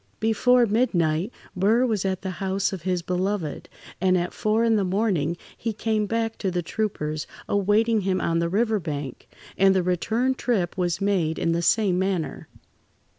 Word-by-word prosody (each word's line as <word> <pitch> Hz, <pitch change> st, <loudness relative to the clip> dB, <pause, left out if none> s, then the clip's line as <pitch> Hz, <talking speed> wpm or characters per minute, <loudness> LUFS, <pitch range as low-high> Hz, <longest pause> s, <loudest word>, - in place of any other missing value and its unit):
Before 240 Hz, +3 st, +3 dB
midnight, 195 Hz, -5 st, +1 dB, 0.2 s
Burr 215 Hz, +7 st, +3 dB
was 215 Hz, -6 st, -1 dB
at 190 Hz, -1 st, -2 dB
the 190 Hz, -, -3 dB
house 190 Hz, +3 st, -1 dB
of 190 Hz, -, -5 dB
his 180 Hz, 0 st, -1 dB
beloved, 180 Hz, -3 st, -2 dB, 0.3 s
and 185 Hz, -1 st, +3 dB
at 175 Hz, 0 st, -2 dB
four 215 Hz, +2 st, +1 dB
in 230 Hz, -1 st, +3 dB
the 205 Hz, -, +2 dB
morning 180 Hz, -5 st, 0 dB, 0.2 s
he 225 Hz, -1 st, -3 dB
came 215 Hz, -1 st, -1 dB
back 225 Hz, +1 st, -2 dB
to 195 Hz, -, -1 dB
the 175 Hz, -1 st, -2 dB
troopers 155 Hz, -7 st, -3 dB, 0.2 s
awaiting 210 Hz, +3 st, +2 dB
him 185 Hz, -1 st, 0 dB
on 165 Hz, -1 st, 0 dB
the 170 Hz, 0 st, 0 dB
river 220 Hz, +3 st, +1 dB
bank, 145 Hz, -6 st, -6 dB, 0.3 s
and 195 Hz, 0 st, +5 dB
the 185 Hz, -, +2 dB
return 220 Hz, +9 st, 0 dB
trip 215 Hz, -9 st, -1 dB
was 180 Hz, 0 st, -1 dB
made 180 Hz, -6 st, +1 dB
in 165 Hz, -, 0 dB
the 170 Hz, +1 st, 0 dB
same 185 Hz, 0 st, +2 dB
manner. 190 Hz, -4 st, -2 dB
190 Hz, 175 wpm, -24 LUFS, 175-220 Hz, 0.3 s, and